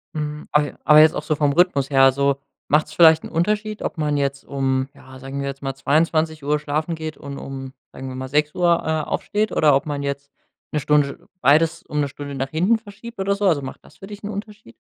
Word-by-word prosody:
Mhm, 150 Hz, 0 st, -4 dB
aber 150 Hz, -1 st, +1 dB
aber 150 Hz, 0 st, +7 dB
jetzt 155 Hz, +1 st, +6 dB
auch -, -, -3 dB
so 155 Hz, -, 0 dB
vom 145 Hz, -1 st, +1 dB
Rhythmus 145 Hz, -5 st, +2 dB
her, 135 Hz, -1 st, +6 dB
so 140 Hz, +1 st, +1 dB, 0.3 s
macht's 150 Hz, +1 st, +1 dB
vielleicht 160 Hz, -2 st, +6 dB
'n -, -, -7 dB
Unterschied, 210 Hz, +5 st, -1 dB
ob -, -, -4 dB
man 150 Hz, -1 st, 0 dB
jetzt 140 Hz, -1 st, -2 dB
um 135 Hz, -1 st, -1 dB
ja, 130 Hz, -2 st, -14 dB
sagen 135 Hz, +1 st, -6 dB
wir 140 Hz, -, -3 dB
jetzt 140 Hz, 0 st, -6 dB
mal, 135 Hz, 0 st, -2 dB
22:00 155 Hz, +1 st, +1 dB
schlafen 155 Hz, +3 st, -2 dB
geht 160 Hz, -1 st, -6 dB
und 140 Hz, -1 st, -8 dB
um 135 Hz, -1 st, -7 dB, 0.2 s
sagen 135 Hz, -, -8 dB
wir 130 Hz, -, -7 dB
mal, 130 Hz, 0 st, -5 dB
06:00, 150 Hz, +4 st, +2 dB
äh, 160 Hz, 0 st, 0 dB
aufsteht 215 Hz, +1 st, -1 dB
oder 150 Hz, -3 st, +4 dB
ob 140 Hz, -, 0 dB
man 145 Hz, -1 st, -3 dB
jetzt 140 Hz, 0 st, -4 dB, 0.4 s
'ne 150 Hz, -, 0 dB
Stunde 145 Hz, 0 st, 0 dB
beides 155 Hz, +3 st, +3 dB
um 150 Hz, -, -4 dB
'ne 145 Hz, -, +1 dB
Stunde 140 Hz, 0 st, -8 dB
nach 135 Hz, 0 st, -3 dB
hinten 180 Hz, +10 st, +2 dB
verschiebt 220 Hz, +1 st, -12 dB
oder 200 Hz, +1 st, +1 dB
so? 205 Hz, +1 st, -2 dB
Also, 160 Hz, -6 st, +2 dB
macht 130 Hz, -, -8 dB
das -, -, -19 dB
für 195 Hz, -, -11 dB
dich 205 Hz, 0 st, -10 dB
'n 205 Hz, -, -4 dB
Unterschied? 210 Hz, -, -8 dB
150 Hz, 225 wpm, -21 LUFS, 140-165 Hz, 0.4 s, aber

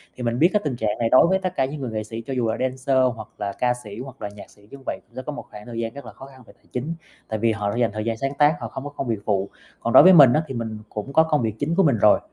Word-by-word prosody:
Thì 125 Hz, -, -7 dB
mình 120 Hz, +1 st, -1 dB
biết 170 Hz, +3 st, +6 dB
cái 210 Hz, -, +2 dB
tình 145 Hz, -5 st, -2 dB
trạng 110 Hz, -3 st, -2 dB
này 115 Hz, -1 st, +1 dB
đối 130 Hz, -, +6 dB
với 190 Hz, +2 st, +2 dB
tất 185 Hz, -1 st, -3 dB
cả 130 Hz, -, +2 dB
những 140 Hz, +1 st, -6 dB
người 125 Hz, -, -4 dB
nghệ 110 Hz, -1 st, -3 dB
sĩ, 115 Hz, +2 st, -7 dB
cho 135 Hz, -, -4 dB
dù 125 Hz, -3 st, 0 dB
là 110 Hz, -, -1 dB
dancer 130 Hz, +1 st, 0 dB, 0.2 s
hoặc 110 Hz, -1 st, -9 dB
là 100 Hz, -1 st, -3 dB
ca 125 Hz, -1 st, +2 dB
sĩ 105 Hz, +1 st, -9 dB
hoặc 135 Hz, 0 st, -9 dB
là 100 Hz, -, -4 dB
nhạc 100 Hz, 0 st, -13 dB
sĩ 105 Hz, -, -22 dB
như 140 Hz, -, -9 dB
vậy, -, -, -3 dB, 0.2 s
sẽ 130 Hz, -, -4 dB
có 150 Hz, -, -5 dB
một 145 Hz, -, -8 dB
khoảng 105 Hz, 0 st, -11 dB
thời 115 Hz, -1 st, -6 dB
gian 115 Hz, 0 st, -3 dB
rất 140 Hz, -, -10 dB
là -, -, -9 dB
khó 135 Hz, -, -12 dB
khăn 130 Hz, -2 st, -16 dB
về -, -, -16 dB
tài -, -, -34 dB
chính, 140 Hz, +7 st, -3 dB, 0.3 s
tại 110 Hz, -, -3 dB
vì 115 Hz, +1 st, +2 dB
họ 105 Hz, -2 st, -2 dB
đã -, -, -4 dB
dành 120 Hz, -2 st, +2 dB
thời 110 Hz, 0 st, -4 dB
gian 115 Hz, -1 st, -1 dB
sáng 135 Hz, +3 st, -2 dB
tác, 150 Hz, +1 st, +4 dB
họ 115 Hz, -, -3 dB
không 130 Hz, -, -7 dB
có 145 Hz, -, -5 dB
công 145 Hz, -3 st, -5 dB
việc 115 Hz, -3 st, -1 dB
phụ. 100 Hz, -2 st, 0 dB, 0.3 s
Còn 115 Hz, -, -2 dB
đối -, -, +10 dB
với 185 Hz, +1 st, +8 dB
mình 140 Hz, -7 st, +8 dB
á, 155 Hz, -, +2 dB
thì 135 Hz, -, -6 dB
mình 110 Hz, -2 st, -4 dB
cũng 110 Hz, +6 st, -6 dB
có 160 Hz, -, +6 dB
công 150 Hz, -3 st, +1 dB
việc 110 Hz, -2 st, -2 dB
chính 155 Hz, +4 st, -1 dB
của 195 Hz, -, +4 dB
mình 140 Hz, -8 st, +3 dB
rồi, 105 Hz, 0 st, +5 dB
125 Hz, 350 wpm, -23 LUFS, 110-140 Hz, 0.3 s, đối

